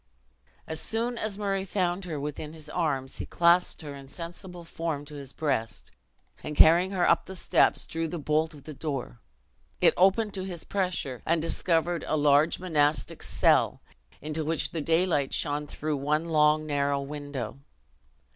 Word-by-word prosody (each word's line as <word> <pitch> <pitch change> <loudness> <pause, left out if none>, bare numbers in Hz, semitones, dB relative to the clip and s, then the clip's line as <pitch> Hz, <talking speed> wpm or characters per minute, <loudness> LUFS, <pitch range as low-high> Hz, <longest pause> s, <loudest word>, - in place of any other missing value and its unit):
As 160 0 -2
soon 235 +2 -1
as 210 -2 -2
Murray 195 -2 -1
found 185 -1 -1
her 160 -4 -4
within 150 +1 -5
his 155 -2 -10
arms, 145 -6 -2
he - - -3
clasped 170 0 +3
her 145 -2 -6
insensible 170 +5 -9
form 165 -3 -4
to 150 - -12
his 140 -2 -5
breast, 115 -9 -2 0.5
and 150 - -5
carrying 170 +4 +7
her 185 -3 +1
up - - +3
the 190 - -8
steps, - - +2
drew 165 0 -3
the 170 - -4
bolt 155 +1 0
of 145 - -14
the 155 - -8
door. 135 - -5 0.6
It - - +5
opened 195 +3 +3
to 190 - -4
his 180 -3 -6
pressure, 180 -10 -2
and 165 +1 +2
discovered 165 0 0
a 155 - +1
large 145 +2 +4
monastic 150 -4 0
cell, - - +2 0.4
into 155 +1 -3
which 160 +1 0
the 165 - -3
daylight 160 -3 +1
shone 145 0 0
through 150 0 -3
one 150 +4 0
long 155 -1 +3
narrow 140 -1 0
window. 140 -4 -6
155 Hz, 165 wpm, -28 LUFS, 145-175 Hz, 0.6 s, carrying